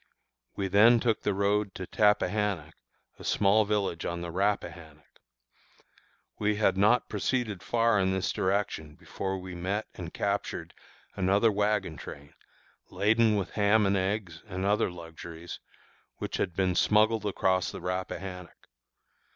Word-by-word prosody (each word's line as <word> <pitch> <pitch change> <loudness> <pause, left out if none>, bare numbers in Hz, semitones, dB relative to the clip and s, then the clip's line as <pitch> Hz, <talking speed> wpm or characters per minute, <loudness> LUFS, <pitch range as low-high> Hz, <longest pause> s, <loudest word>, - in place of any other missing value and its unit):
We 100 - -2
then 110 +5 +6
took 115 -2 0
the 105 - 0
road 100 0 0
to 95 - -5
Tappahannock, 105 -5 +1 0.5
a - - -10
small 105 +2 +3
village 100 -5 -1
on 85 0 -3
the 85 -1 -5
Rappahannock. 85 -6 -3 1.2
We 105 0 +1
had 105 -2 +2
not 105 +6 +3
proceeded 115 -8 -2
far 115 +1 +2
in 95 0 +2
this 95 -1 0
direction 95 -6 -1
before 95 0 -4
we 90 -1 -8
met 95 +5 -2
and 85 -2 -7
captured 100 0 -3 0.4
another 100 +4 +3
wagon 105 -5 0
train, 70 0 -10 0.6
laden 110 +1 +3
with 95 -3 -2
ham 105 0 +3
and 100 +1 +2
eggs 95 -3 -2
and 95 -1 -4
other 105 0 +2
luxuries, 85 -1 -9 0.6
which - - -4
had 85 - -2
been 95 -1 +1
smuggled 110 +3 +3
across 95 -2 +1
the - - -7
Rappahannock. 90 0 -6
100 Hz, 135 wpm, -29 LUFS, 90-105 Hz, 1.2 s, then